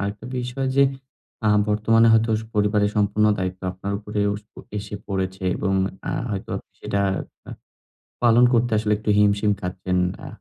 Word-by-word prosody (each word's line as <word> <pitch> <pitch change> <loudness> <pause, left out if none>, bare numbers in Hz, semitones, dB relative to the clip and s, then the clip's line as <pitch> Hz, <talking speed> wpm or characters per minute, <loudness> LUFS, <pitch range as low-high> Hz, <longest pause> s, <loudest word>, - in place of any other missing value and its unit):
আরেকটা 100 +3 -4
বিষয় 125 +2 -3
যে 140 - +7 0.6
আ - - +5 0.2
বর্তমানে 115 +2 +4
হয়তো 115 0 +3
স - - -8
পরিবারের 105 0 +2
সম্পূর্ণ 105 +1 +2
দায়িত্ব 95 0 -3
আপনার 95 +2 -5
উপরেও 105 -1 -1 0.5
এসে 105 - -7
পড়েছে 95 -1 -3
এবং 95 0 0 0.3
আ - - -1 0.2
হয়তো 100 -2 -4 0.3
সেটা 100 - -2 0.5
আ - - -6 0.7
পালন 120 +1 +6
করতে 120 0 +2
আসলে 105 0 +1
একটু 110 0 -4
হিমশিম 105 0 +3
খাচ্ছেন। 90 0 -2 0.3
আ - - -7
105 Hz, 150 wpm, -23 LUFS, 100-110 Hz, 0.7 s, যে